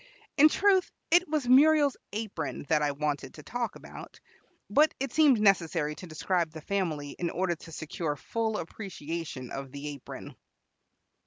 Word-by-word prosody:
In 305 +2 +7
truth, 385 +2 +3 0.2
it 350 +2 +5
was 300 -5 0
Muriel's 285 +1 +6 0.2
apron 200 -11 -4
that 155 -2 +3
I 145 -1 +2
wanted 145 -2 -3
to 155 - -11
talk 235 +2 -3
about; - - -11 0.5
but 305 +2 +4
it 270 +1 -3
seemed 295 -7 +5
necessary 170 -7 +2
to 180 - -10
describe 170 +1 0
the 160 0 -10
family 160 -6 -2
in 175 - 0
order 180 0 0
to 165 - -13
secure 160 -1 -3
full 220 +8 -2
appreciation 165 - -6
of 135 -1 -6
the 140 +2 -6
apron. 145 -1 -9
175 Hz, 155 wpm, -29 LUFS, 150-245 Hz, 0.5 s, In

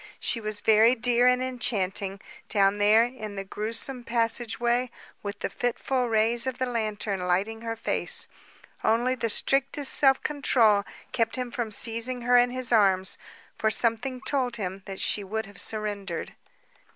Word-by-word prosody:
She 230 - -2
was 215 -1 -4
very 220 +3 +5
dear 245 +1 +3
and 250 0 +3
enchanting, 200 -6 -2 0.3
down 200 -1 +2
there 210 +2 +5
in 220 -5 -7
the 195 - -4
grewsome 230 +6 -4
passageway 235 +1 +1 0.3
with 205 0 -6
the - - -2
fitful 250 +1 -1
rays 225 +3 +1
of 260 -1 -3
the 260 - 0
lantern 215 -4 -2
lighting 190 +5 -1
her 230 0 -4
face. 225 - -1 0.6
Only 240 +3 +2
the 235 -3 -2
strictest 275 +5 +1
self 270 -2 +3
control 230 -8 +2 0.3
kept 230 -2 0
him 250 -2 -4
from 240 -4 -3
seizing 230 +3 +2
her 245 +1 +3
in 245 0 +5
his 255 0 -2
arms, 195 -4 +2 0.4
for 220 - +2
something 240 +3 +1
told 255 -4 -1
him 195 -3 -5
that 195 -1 -6
she 205 - 0
would 220 +3 -3
have 200 -1 -8
surrendered. 205 -5 -4
230 Hz, 155 wpm, -26 LUFS, 205-245 Hz, 0.6 s, very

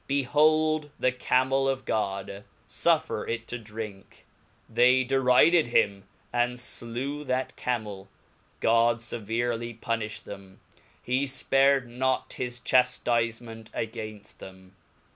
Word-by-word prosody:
Behold 150 +2 +2
the 130 - +2
Camel 130 +1 +1
of 130 -2 -2
God, 100 -1 -2 0.2
fuffer - - +1
it 115 0 -3
to 120 - -4
drink; 105 -3 -9 0.4
they 125 +1 +4
deri 130 +3 +4
ded 170 -5 +4
him, 100 -4 +1 0.3
and 120 0 0
flew 125 +5 -4
that 130 0 -2
Camel, 105 -6 -4 0.5
God 115 +1 +4
feverely 115 +1 -3
puniflied 110 -2 -3
them, 95 -1 -11 0.4
he 130 +3 0
Ipared 135 0 +2
not 130 +2 -1
his 125 -1 -5
chaftifement 115 -3 0
againft 110 -2 -6
them. 95 0 -13
120 Hz, 110 wpm, -27 LUFS, 110-130 Hz, 0.5 s, they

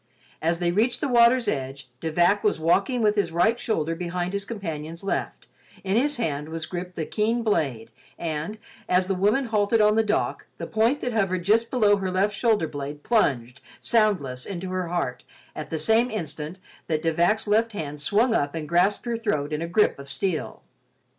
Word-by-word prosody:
As 165 +1 +1
they 175 0 0
reached 235 +6 +1
the 300 - -1
water's 240 0 +4
edge, 135 0 -3
De 160 +2 -3
Vac 175 +5 +3
was 210 - +1
walking 200 +9 +2
with 210 -1 +3
his 205 -4 0
right 200 +8 +2
shoulder 165 -9 -1
behind 175 +1 -3
his 200 0 -2
companion's 165 -6 -6
left, 195 - -3 0.4
in 195 +1 0
his 285 +5 +1
hand 150 -9 -2
was 160 0 -4
gripped 180 0 -6
the 160 - -3
keen 225 +5 0
blade 135 - -1 0.3
and, 160 +5 -4 0.3
as 180 +1 +3
the 195 - -1
woman 210 +8 +2
halted 220 0 +1
on 210 0 +5
the 225 - +4
dock, 215 0 -1
the - - -5
point 230 +6 +1
that 245 - -2
hovered 190 -5 0
just 225 +5 +2
below 210 -5 +3
her 190 -1 -2
left 195 +3 +1
shoulder 215 -5 +2
blade 145 0 -6
plunged, 130 - +1 0.2
soundless, 185 - +1
into 185 -1 -5
her 185 -1 -2
heart 165 -8 -2 0.3
at - - -6
the 160 - -2
same 225 +10 +3
instant 160 - -5 0.3
that 155 -1 -1
De 165 -1 +1
Vac's 175 +7 +2
left 220 +2 +2
hand 150 -6 -5
swung 220 - +2
up 145 -7 0
and 155 -2 -4
grasped 180 +8 +2
her 235 -1 -1
throat 155 -10 -1
in 150 - -2
a 170 - -2
grip 180 -3 +2
of 140 0 -10
steel. 160 +4 -3
185 Hz, 195 wpm, -25 LUFS, 160-220 Hz, 0.4 s, on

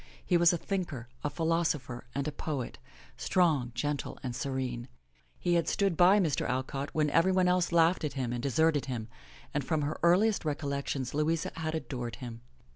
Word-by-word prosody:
He 180 - +2
was 170 -1 +6
a 175 - 0
thinker, 170 - -4
a 150 - 0
philosopher 160 -7 -1
and 140 +1 -1
a - - -1
poet, 145 -4 -4 0.4
strong, 155 -9 +2
gentle 145 -1 -2
and 125 -2 -3
serene. 125 -3 -3 0.5
He 175 - 0
had 170 -1 +2
stood 195 -4 +1
by 185 +5 +6
Mr. 160 -9 0
Alcott 130 +2 -2
when 150 -2 +2
everybody 185 +3 +4
else 180 -1 +2
laughed 170 +1 +4
at 150 - -2
him 125 -3 -2
and 120 - -3
deserted 145 +3 +2
him, 115 -4 -4 0.4
and 145 - 0
from 155 +1 0
her 145 +2 -3
earliest 195 +5 +4
recollections 140 -3 -2
Louisa 155 +2 0
had 160 -1 -2
adored 120 -7 -4
him. 120 -3 -8
150 Hz, 175 wpm, -30 LUFS, 130-170 Hz, 0.5 s, was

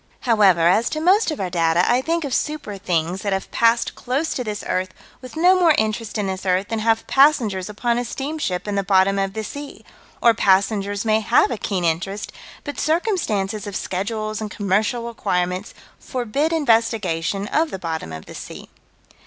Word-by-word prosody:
However, 205 -8 +4
as 215 +6 +3
to 310 - -3
most 370 +6 +3
of 310 - -4
our 185 -2 -3
data, 170 0 +2
I 245 +1 +3
think 330 +2 -1
of 270 - -4
super 295 -10 -2
things 175 0 -1
that 200 -2 -1
have 190 - -3
passed 230 0 +2
close 275 +6 -2
to 250 - -3
this 210 -2 -5
earth 185 0 -2 0.3
with 255 +2 -11
no 365 +3 +5
more 335 -4 +5
interest 220 0 -1
in 210 - -1
this 190 -1 -4
earth 185 +1 0
than 225 - -2
have 225 +1 +1
passengers 240 -10 +3
upon 235 +3 -1
a - - -1
steamship 270 - -3
in 205 - -2
the 200 - +1
bottom 195 0 +3
of 195 0 -1
the 220 - -4
sea 285 +6 -8 0.3
or 235 - +5
passengers 200 +1 +1
may 215 0 +3
have 230 +4 +3
a - - 0
keen 185 -4 -2
interest, 190 +5 -2 0.3
but 290 - -6
circumstances 220 - -1
of 200 - -6
schedules 215 +4 -3
and 215 - -4
commercial 210 +4 0
requirements 185 -4 -2 0.2
forbid 260 +5 -2
investigation 225 - +1
of 315 +1 +1
the - - -5
bottom 165 - -4
of 80 0 -8
the - - -11
sea. - - -9
215 Hz, 185 wpm, -21 LUFS, 190-250 Hz, 0.3 s, no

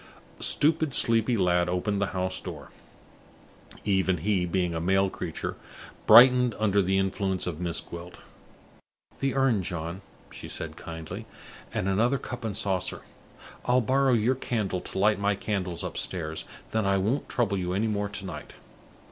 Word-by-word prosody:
A - - -4
stupid, 155 -2 +2
sleepy 115 +1 +4
lad 90 -2 +2
opened 100 +3 -1
the 100 - +1
house 95 0 -3
door. - - -8 1.2
Even 95 -2 +2
he, 90 +1 0
being 90 -1 0
a 80 - -2
male 95 +2 +2
creature, 85 -3 -5 0.5
brightened 125 +1 +8
under 100 -2 +2
the 95 +1 +1
influence 95 -1 -1
of 85 -3 -4
Miss 85 -2 -2
Gwilt. 85 +1 -10 1.0
"The 135 -1 -1
urn, 135 -7 +3
John," 85 +1 -4 0.3
she - - -8
said, - - -5
kindly, 80 -1 -8 0.4
"and 95 - -2
another 115 +8 +2
cup 120 -2 -7
and 105 -3 -3
saucer. 95 -4 -1 0.6
I'll 125 +1 +4
borrow 130 +2 +2
your 115 +2 +3
candle 110 -8 -2
to - - -8
light 105 +1 +3
my 100 0 +1
candles 95 -4 -3
upstairs, 80 -3 -3 0.2
and - - -26
then 110 -2 0
I 100 0 +3
won't 110 +9 -1
trouble 105 -5 0
you 90 0 -2
any 100 +4 0
more 105 -2 -1
to 100 -1 -7
night." 80 -5 -8
100 Hz, 160 wpm, -27 LUFS, 90-115 Hz, 1.2 s, brightened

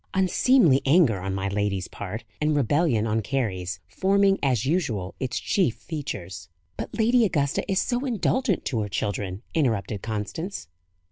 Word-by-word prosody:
"Unseemly 190 - +4
anger 135 - +4
on 95 +1 -3
my 95 0 -2
lady's 100 -2 -1
part, 100 +3 -6 0.2
and 150 0 +2
rebellion 140 -3 +2
on 110 0 0
Carry's, 95 -8 -2
forming, 195 0 +2
as 130 -4 +1
usual, 120 - -1
its 125 -2 -2
chief 175 - +1
features." 90 - -6 0.3
"But - - -6
Lady 235 +2 +4
Augusta 145 -9 +1
is 190 - +2
so 245 +4 -1
indulgent 245 -2 0
to 120 - -1
her 105 - -3
children!" 100 +1 -3
interrupted 110 -8 0
Constance. 110 - -4
130 Hz, 145 wpm, -25 LUFS, -, 0.3 s, Unseemly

